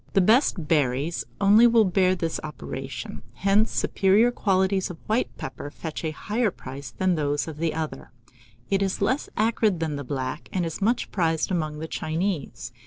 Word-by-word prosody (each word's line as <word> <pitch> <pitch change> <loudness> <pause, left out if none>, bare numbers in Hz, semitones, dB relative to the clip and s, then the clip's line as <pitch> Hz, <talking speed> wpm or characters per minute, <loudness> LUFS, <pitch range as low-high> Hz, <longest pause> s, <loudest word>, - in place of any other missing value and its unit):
The - - +4
best 200 - +3
berries 145 0 +1
only 210 +4 +7
will 230 -2 +5
bear 185 0 +3
this 165 -2 -2
operation; 135 -4 -6
hence 200 - +2
the - - -5
superior 205 +5 +3
qualities 190 -3 +1
of 175 - -7
white 220 +3 +1
pepper 135 +2 -6
fetch 160 +2 -6
a 160 - 0
higher 210 +8 -1
price 135 -6 -8
than 185 +10 0
those 145 -2 0
of 155 -2 -7
the 160 0 -1
other. 160 -1 -4 0.6
It 195 0 +2
is 195 -1 0
less 255 +8 0
acrid 215 -4 +2
than 155 -3 -2
the 145 - -5
black, 130 -1 -4
and 180 -2 0
is 165 +4 -5
much 230 +5 +1
prized 165 -2 0
among 155 -4 -1
the 160 +1 -5
Chinese. 155 -8 -3
170 Hz, 175 wpm, -25 LUFS, 150-200 Hz, 0.6 s, only